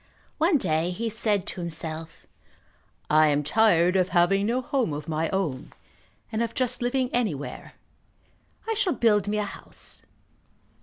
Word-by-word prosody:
One 325 Hz, +1 st, +4 dB
day 165 Hz, -, 0 dB
he 225 Hz, +5 st, -3 dB
said 210 Hz, -3 st, 0 dB
to 180 Hz, -, -4 dB
himself, 160 Hz, -1 st, -4 dB, 0.8 s
"I 155 Hz, 0 st, +5 dB
am 145 Hz, 0 st, +2 dB
tired 180 Hz, +1 st, +3 dB
of 185 Hz, -1 st, +2 dB
having 195 Hz, +4 st, +3 dB
no 240 Hz, +3 st, +1 dB
home 255 Hz, -, -1 dB
of 150 Hz, +1 st, -6 dB
my 160 Hz, 0 st, -1 dB
own, 165 Hz, -9 st, -2 dB, 0.6 s
and 220 Hz, -, -1 dB
of 230 Hz, 0 st, -2 dB
just 255 Hz, -2 st, -1 dB
living 250 Hz, +1 st, 0 dB
anywhere. 190 Hz, -, -3 dB, 0.9 s
I 450 Hz, -, +1 dB
shall 400 Hz, -5 st, +1 dB
build 210 Hz, -3 st, +2 dB
me 210 Hz, +1 st, 0 dB
a 210 Hz, -, +1 dB
house." 205 Hz, -, -9 dB
195 Hz, 150 wpm, -26 LUFS, 160-235 Hz, 0.9 s, I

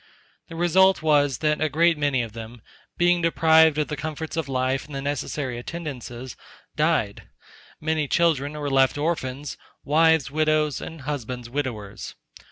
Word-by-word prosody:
The 165 Hz, -, -10 dB
result 180 Hz, +1 st, +3 dB
was, 145 Hz, -4 st, +3 dB
that 150 Hz, 0 st, +1 dB
a 155 Hz, -, +2 dB
great 165 Hz, +3 st, +3 dB
many 145 Hz, -4 st, 0 dB
of 115 Hz, -2 st, -8 dB
them 115 Hz, 0 st, -9 dB, 0.3 s
being 175 Hz, 0 st, +3 dB
deprived 160 Hz, -2 st, +4 dB
of 150 Hz, -, 0 dB
the 150 Hz, -, -4 dB
comforts 155 Hz, +2 st, -5 dB
of 160 Hz, -4 st, -3 dB
life, 130 Hz, +1 st, -1 dB
and 150 Hz, -, -9 dB
the -, -, -2 dB
necessary 140 Hz, -2 st, -3 dB
attendances, 130 Hz, -5 st, -7 dB, 0.4 s
died; -, -, 0 dB, 0.5 s
many 155 Hz, -1 st, -1 dB
children 150 Hz, -3 st, +1 dB
were 145 Hz, -2 st, -4 dB
left 135 Hz, +1 st, +3 dB
orphans, 145 Hz, -3 st, -3 dB, 0.2 s
wives 160 Hz, -1 st, +3 dB
widows, 155 Hz, -1 st, +1 dB
and 160 Hz, -2 st, -8 dB
husbands 125 Hz, -4 st, -5 dB
widowers. 120 Hz, -8 st, -5 dB
145 Hz, 150 wpm, -24 LUFS, 130-160 Hz, 0.5 s, deprived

